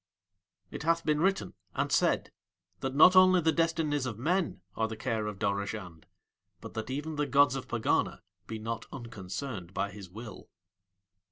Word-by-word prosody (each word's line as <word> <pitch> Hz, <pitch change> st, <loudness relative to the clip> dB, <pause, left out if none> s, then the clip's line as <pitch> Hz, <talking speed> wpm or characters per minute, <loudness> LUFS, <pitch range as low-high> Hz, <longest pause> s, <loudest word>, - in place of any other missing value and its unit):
It -, -, -6 dB
hath 165 Hz, +1 st, +1 dB
been 150 Hz, 0 st, +2 dB
written 195 Hz, +2 st, +1 dB, 0.2 s
and -, -, 0 dB
said -, -, +2 dB, 0.5 s
that 135 Hz, 0 st, -3 dB
not 180 Hz, +5 st, +8 dB
only 185 Hz, 0 st, +7 dB
the 160 Hz, -1 st, +3 dB
destinies 160 Hz, -4 st, +1 dB
of 115 Hz, -5 st, -4 dB
men 170 Hz, -, 0 dB
are 110 Hz, -, +1 dB
the 110 Hz, 0 st, -6 dB
care 110 Hz, -1 st, -1 dB
of 105 Hz, -2 st, -5 dB
Dorozhand 100 Hz, -4 st, -3 dB, 0.5 s
but -, -, -9 dB
that 110 Hz, +2 st, -4 dB
even 150 Hz, +3 st, -3 dB
the 150 Hz, 0 st, 0 dB
gods 140 Hz, 0 st, +5 dB
of 135 Hz, -, -5 dB
Pegana 120 Hz, -1 st, 0 dB, 0.2 s
be 110 Hz, -, -4 dB
not 115 Hz, +1 st, -4 dB
unconcerned 105 Hz, -4 st, -6 dB
by 100 Hz, -, -1 dB
his 100 Hz, -2 st, -10 dB
will. 110 Hz, +4 st, -10 dB
125 Hz, 165 wpm, -30 LUFS, 105-155 Hz, 0.5 s, not